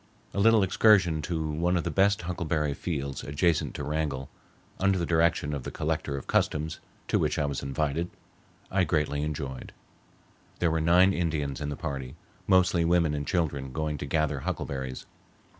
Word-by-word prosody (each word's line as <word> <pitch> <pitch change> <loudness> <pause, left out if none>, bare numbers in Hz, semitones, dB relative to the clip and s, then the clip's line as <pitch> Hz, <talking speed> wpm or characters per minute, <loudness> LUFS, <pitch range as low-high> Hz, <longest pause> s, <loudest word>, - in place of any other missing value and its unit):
A - - -2
little 110 0 +5
excursion 95 -4 +4
to 80 0 -2
one 85 +4 +1
of 85 - -1
the - - -2
best 100 -1 +3
huckleberry 80 -4 -1
fields 70 -3 -4
adjacent 80 +3 0
to - - -4
Wrangell, 75 -3 -2 0.5
under 95 0 +3
the 85 - 0
direction 80 -3 +2
of 70 - -3
the - - -5
Collector 70 -1 -2
of 70 - -7
Customs, 75 +1 0 0.3
to - - +2
which - - 0
I 75 - +1
was 70 -1 -2
invited, 75 +4 -1 0.6
I 95 0 +3
greatly 75 -3 0
enjoyed. 70 -4 -4 0.8
There 85 -2 +1
were 80 0 0
nine 90 +4 +5
Indians 75 -6 -2
in 75 - -2
the 75 - -3
party, 70 -2 -5 0.3
mostly 95 -2 +4
women 85 -2 +3
and 70 -1 -3
children 70 -6 -1
going 75 +1 -2
to 70 - -4
gather 75 -1 0
huckleberries. 65 -1 -4
80 Hz, 170 wpm, -28 LUFS, 70-85 Hz, 0.8 s, little